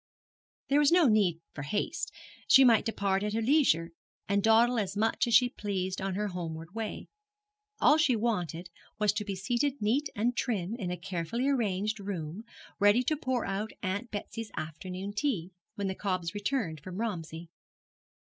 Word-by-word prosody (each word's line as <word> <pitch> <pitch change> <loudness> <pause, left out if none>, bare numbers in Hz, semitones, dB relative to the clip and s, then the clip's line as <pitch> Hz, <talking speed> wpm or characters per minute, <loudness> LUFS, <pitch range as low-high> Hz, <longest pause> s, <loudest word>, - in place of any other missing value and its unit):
There 280 +1 +4
was 295 0 +4
no 350 -1 +6
need 195 -7 +3
for 145 - -6
haste. 300 - -2 0.4
She 270 - +8
might 230 -3 +5
depart 200 -3 0
at 210 0 -2
her 225 - +1
leisure, 220 - +3 0.4
and 200 +1 +2
dawdle 230 +3 +4
as 200 -1 -3
much 225 +3 +1
as 235 - +3
she 245 +2 +7
pleased 190 -5 -3
on 190 -1 -2
her 210 +1 -1
homeward 165 -1 -6
way. 220 -1 -5 0.7
All 300 - +6
she 300 -6 +3
wanted 180 -6 -2 0.3
was 210 -2 +2
to 210 0 -2
be 200 -2 -4
seated 245 +9 -1
neat 255 +8 +1
and 235 +4 0
trim 210 -7 -1
in 210 -7 -4
a 180 - -3
carefully 180 +9 -2
arranged 215 -5 0
room, 195 0 -5 0.3
ready 205 +5 +5
to 310 +5 +1
pour 260 -4 -1
out 200 +3 -3
Aunt 200 +5 -2
Betsy's 220 +1 -5
afternoon 185 +5 -5
tea, 205 - -1 0.2
when 200 - -3
the 190 - -1
cobs 185 -4 -2
returned 205 - -2
from 180 +4 -8
Romsey. 170 -7 -4
205 Hz, 170 wpm, -30 LUFS, 185-235 Hz, 0.7 s, She